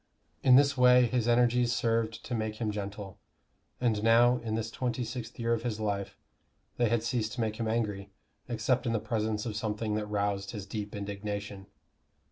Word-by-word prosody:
In 130 -1 +6
this 140 +1 +5
way 125 -1 +6
his 120 -1 0
energies 120 0 +3
served 115 -2 0
to 125 - -5
make 110 -2 -2
him 110 -1 -2
gentle; 100 -1 -6 0.6
and 115 -4 +1
now, 120 +2 +5
in 115 -2 -3
this 110 0 -3
twenty 125 +1 -2
sixth 120 0 -6
year 115 -1 0
of 115 - -1
his 115 -3 -3
life, 100 -2 -3 0.6
they 120 -2 +2
had 115 0 +1
ceased 115 -2 -1
to 125 - -3
make 110 -1 -1
him 115 - -2
angry, 105 -3 -2 0.4
except 120 +2 0
in 115 - +1
the 115 - +1
presence 110 -1 -2
of 110 -3 -4
something 105 0 -2
that 105 0 -2
roused 100 -1 -1
his 100 -1 -6
deep 105 +1 -5
indignation. 100 -1 -5
110 Hz, 185 wpm, -30 LUFS, 105-120 Hz, 0.6 s, In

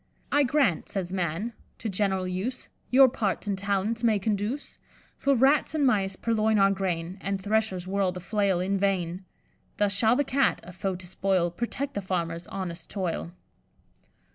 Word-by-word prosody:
'I 290 - +4
grant,' 255 - +1
says 185 -2 -3
Man, 185 +5 -2 0.2
'to 225 - -5
general 190 -2 0
use 190 +8 -4 0.2
Your 265 +1 +8
parts 210 -7 -1
and 200 -1 0
talents 200 +4 -1
may 225 -3 +4
conduce; 210 +7 -2 0.4
For 280 0 +2
rats 275 +5 +3
and 295 -2 +2
mice 195 -6 +2
purloin 220 0 +1
our 195 0 +5
grain, 185 -1 -2
And 195 0 -2
threshers 205 -3 0
whirl 195 0 +1
the 180 - -6
flail 195 -1 +1
in 195 +2 0
vain; 185 -2 -1 0.5
Thus 205 -1 +2
shall 220 +3 +3
the 285 - +2
Cat, 275 0 +2
a 180 +2 -10
foe 190 +1 -2
to 180 0 -9
spoil, 185 -1 0
Protect 240 +8 -3
the 200 - -2
farmers' 170 -2 -2
honest 175 -3 -5
toil. 180 -3 -3
195 Hz, 165 wpm, -27 LUFS, 185-220 Hz, 0.5 s, Your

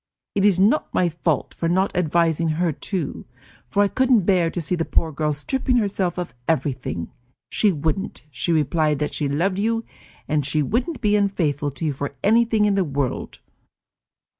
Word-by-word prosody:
It 195 - +1
is 200 -3 +5
not 210 +11 +2
my 180 - +3
fault 160 -3 -1
for 165 - -2
not 190 +3 +1
advising 165 -1 +2
her 175 -1 +1
to, 165 +1 -4 0.4
for 205 - +2
I - - +3
couldn't 250 -3 +3
bear 180 -4 +3
to 175 - -4
see 165 +1 -2
the 170 -2 +1
poor 160 0 0
girl 150 +1 -1
stripping 250 - -1
herself 195 -5 0
of 175 -9 -4
everything. 130 - -2 0.4
She 210 - +3
wouldn't; 160 +2 -3
she 130 +6 -2
replied 155 -1 +2
that 150 +1 -2
she 145 -2 -1
loved 185 +7 0
you, 225 +2 0 0.4
and 150 -1 +1
she 150 +2 0
wouldn't 250 - -1
be 210 -2 +3
unfaithful 165 -8 0
to 140 +4 -6
you 150 - 0
for 140 +1 -5
anything 225 0 +3
in 205 - +3
the 195 -1 +2
world. 140 -5 -3
170 Hz, 180 wpm, -22 LUFS, 150-200 Hz, 0.4 s, is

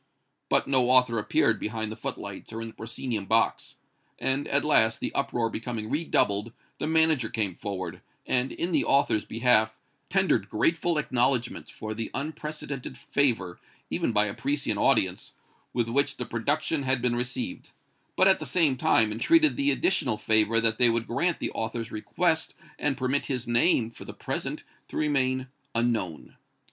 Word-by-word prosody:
But - - +2
no 130 -2 +2
author 125 -3 +4
appeared 105 - +1
behind 110 0 -3
the - - -6
footlights 100 -3 -6
or 115 - -5
in 115 0 -5
the - - -13
proscenium 110 -1 -4
box; 115 0 +1 0.4
and, 135 +2 0
at 140 +1 +1
last, 110 -7 +3
the - - -3
uproar 130 -4 0
becoming 115 -1 -5
redoubled, 115 -8 +1 0.3
the 150 - -2
manager 160 -7 +3
came 105 -5 -1
forward, 95 0 -6 0.2
and, 125 +1 +1
in 175 - -3
the - - +2
author's 140 -6 +2
behalf, 110 -2 +3 0.3
tendered 190 -1 +1
grateful 165 0 +1
acknowledgments 125 -3 0
for 110 0 -6
the 115 +1 -4
unprecedented 145 -2 -5
favor, 120 -10 0 0.3
even - - 0
by 105 +1 +3
a 100 - -3
Parisian 145 +1 -1
audience, - - +1 0.4
with 120 -2 -1
which 140 +5 +1
the 125 - -3
production 145 +7 0
had 130 -1 +1
been 120 0 +1
received, 245 - -4 0.5
but, 185 - +5
at 190 - +4
the - - -5
same 155 -7 +2
time, 110 -3 +3
entreated 310 - +3
the 280 0 +1
additional 135 - +1
favor 110 +1 +3
that 115 0 +1
they 125 -1 +7
would 115 0 0
grant 170 +9 0
the - - -2
author's 115 0 -4
request, 160 +9 -1 0.2
and 135 -2 0
permit 135 +2 0
his 125 -4 -3
name, 120 -1 +3
for - - -11
the - - -9
present, - - -4 0.2
to - - -7
remain 130 -3 +1 0.3
unknown. 115 -9 -2
125 Hz, 165 wpm, -27 LUFS, 110-145 Hz, 0.5 s, they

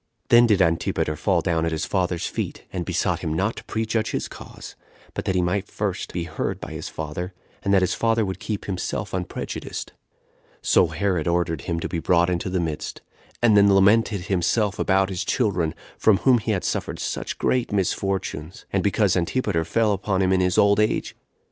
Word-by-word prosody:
Then 120 0 +7
did 100 -4 +4
Antipater 80 -2 0
fall 85 +3 +1
down 80 -2 0
at 85 - 0
his 80 - -1
father's 90 -3 -1
feet, - - -4
and - - -3
besought - - 0
him 80 - -3
not 100 +8 0
to - - -7
prejudge 110 0 -1
his - - -2
cause, - - -11 0.4
but - - -4
that 95 -2 0
he 90 - +2
might 90 +3 -1
be - - -23
first - - -3
heard 85 -2 -3
by - - -7
his - - -5
father, 80 +4 -5 0.3
and 100 - -1
that 95 -1 +5
his 90 - +1
father 115 -1 +1
would 95 0 -4
keep 105 +1 -4
himself 95 -3 -3
unprejudiced. 90 -1 -5 0.7
So 90 - +4
Herod 85 0 -1
ordered 85 -3 0
him 85 +3 -2
to - - -2
be 85 - -3
brought 85 +1 +3
into 90 +1 -1
the 90 0 0
midst, 80 -3 -4 0.4
and 110 -3 +6
then 100 0 +6
lamented 100 +1 +4
himself 95 +3 0
about 95 0 +2
his 95 -1 -2
children, 90 -7 0 0.2
from 110 -3 +5
whom 125 +1 +4
he 110 - -5
had 95 -4 0
suffered - - -2
such - - -4
great 125 -3 0
misfortunes; 95 -4 -2
and 95 - +2
because 100 -1 +2
Antipater 90 -1 0
fell 105 +6 +2
upon 95 -1 0
him 95 0 +3
in 95 - +3
his 90 -1 +1
old 100 0 +5
age. 105 - 0
95 Hz, 195 wpm, -24 LUFS, 85-105 Hz, 0.7 s, Then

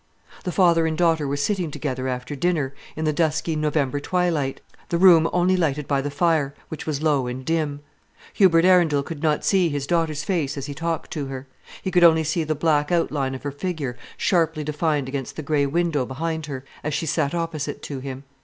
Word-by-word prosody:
The 180 - -1
father 170 -3 +4
and 160 -1 -2
daughter 165 -4 +2
were 140 +1 -1
sitting 180 +3 0
together 130 -3 -3
after 125 +3 -4
dinner 150 -3 0 0.2
in 160 - -3
the 155 - +1
dusky 160 +1 0
November 150 -2 0
twilight, 165 -5 0 0.3
the 170 - +1
room 170 -3 +6
only 180 +1 +3
lighted 150 -5 0
by 140 -2 +1
the 145 - -3
fire, 145 -2 +1
which 160 - -7
was 150 -1 -2
low 145 -5 +2
and 130 +1 -5
dim. 155 -3 -1 0.5
Hubert 170 -4 +5
Arundel 170 -6 +4
could 155 -1 -7
not 155 -2 +1
see 185 -4 +3
his 145 -2 -2
daughter's 160 -2 0
face 150 -7 -1
as 140 - -4
he 145 - -5
talked 165 +2 -3
to 145 -3 -3
her; 135 0 -7 0.4
he 190 - -2
could 180 -1 +4
only 160 -1 +6
see 160 +2 0
the 155 0 -1
black 150 0 +1
outline 145 -6 0
of 130 - -9
her 145 - -3
figure 145 -4 -4 0.2
sharply 165 -4 +1
defined 150 -2 -1
against 135 -1 -4
the 155 - -5
grey 145 -1 +1
window 165 -2 +1
behind 160 +4 -3
her, 135 -2 -6 0.2
as 150 -1 -2
she - - -1
sat 155 0 0
opposite 160 -4 -3
to 140 -2 -5
him. 135 0 -7
155 Hz, 205 wpm, -23 LUFS, 140-165 Hz, 0.5 s, room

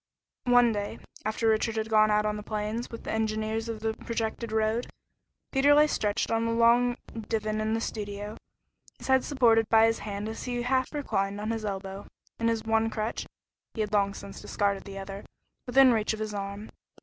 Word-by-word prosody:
One 245 -1 +6
day, 205 -1 -3 0.3
after 220 +1 0
Richard 220 +1 +2
had 220 0 -1
gone 215 -1 +4
out 210 0 +3
on 210 0 0
the 210 - -5
plains 215 +2 -3
with 230 - -8
the - - -4
engineers 220 +1 -1
of 220 -1 -5
the 220 0 0
projected 225 0 -3
road, 220 +2 0 0.6
Peter 285 +1 +5
lay 300 +1 +7
stretched 210 -9 -1
on 225 0 +1
a - - 0
long 235 +1 +4 0.3
divan 215 -1 -1
in 220 +1 0
the 225 - -1
studio, 205 -1 -5 0.6
his - - -9
head 265 -1 +5
supported 230 -6 +3
by 225 0 +6
his 225 0 +1
hand 205 0 -4
as 220 - -6
he 245 -1 -2
half 260 +1 +1
reclined 200 -9 -1
on 215 +2 -2
his 225 -1 -3
elbow, 195 -1 -5 0.3
and 230 0 +2
his 225 -1 -1
one 225 0 +2
crutch 220 +1 -3 0.5
he 220 - -1
had 210 0 -2
long 200 -1 +2
since 200 - -9
discarded 200 -1 -1
the 195 -1 -8
other 195 +1 -7 0.4
within 260 +1 +6
reach 220 -1 +1
of 220 - -6
his 215 -1 -3
arm. 200 +1 -5
220 Hz, 195 wpm, -28 LUFS, 210-230 Hz, 0.6 s, lay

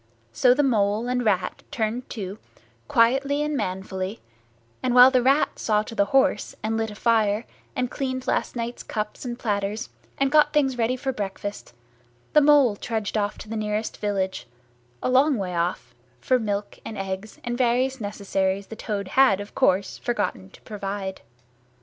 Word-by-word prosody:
So 250 - +5
the 290 - +3
Mole 215 -3 +1
and 250 0 0
Rat 195 -5 0
turned 230 +3 -2
to, 200 -1 -6 0.5
quietly 275 +3 +3
and 300 0 -1
manfully, 190 -1 -3 0.6
and 250 -1 0
while 250 +1 +9
the 255 -1 +3
Rat 270 +4 +2
saw 210 -1 +1
to 220 - -9
the 200 -3 +2
horse, 270 +5 +2
and 220 +1 0
lit 225 0 -1
a 210 - -9
fire, 220 -1 +2 0.3
and 250 -1 -1
cleaned 260 -2 -3
last - - -1
night's 235 0 -4
cups 210 +3 -5
and 240 -1 -4
platters, 205 -1 -2 0.3
and 275 0 +1
got 300 0 +5
things 275 -4 +2
ready 240 +1 +1
for 265 +1 -3
breakfast, 205 -1 -5 0.6
the 300 - +7
Mole 285 -6 +5
trudged 220 -2 -3
off 205 -1 0
to - - -10
the 225 - -5
nearest 215 0 -2
village, 190 - -2 0.6
a - - +1
long 270 +2 +4
way 185 -3 -3
off, 170 -8 -2 0.3
for 255 - +2
milk 205 -2 -3
and 220 - -7
eggs 195 +2 -5
and 240 -1 -2
various 255 +1 +1
necessaries 200 -1 -1
the 225 - -9
Toad 205 -4 -4
had, 260 -8 +4
of 205 0 -8
course, 195 -6 +1
forgotten 95 - -2
to - - -18
provide. 195 -2 -5
220 Hz, 170 wpm, -24 LUFS, 200-255 Hz, 0.6 s, while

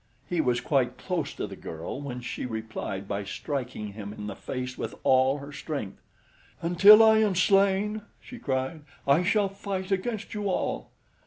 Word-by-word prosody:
He 175 -2 +1
was 125 -4 +1
quite 130 -4 +1
close 170 -6 -2
to - - -3
the 100 -1 -8
girl 85 - -6
when 125 -3 -5
she 120 - -4
replied 110 -4 -5
by 100 0 -2
striking 125 -1 -4
him 100 -1 -7
in 105 -1 -7
the 100 -2 -5
face 125 -1 -5
with - - -5
all 130 +1 +4
her 140 0 -9
strength. 140 -11 -5 0.6
"Until 195 +6 +8
I 220 0 +6
am 210 -3 +2
slain," 200 +3 +3 0.2
she 250 - -11
cried, 130 +3 -2 0.3
"I 140 +5 +5
shall 200 +3 +2
fight 195 -1 -5
against 200 +3 -2
you 205 -2 -2
all." 185 - -2
140 Hz, 170 wpm, -27 LUFS, 120-195 Hz, 0.6 s, Until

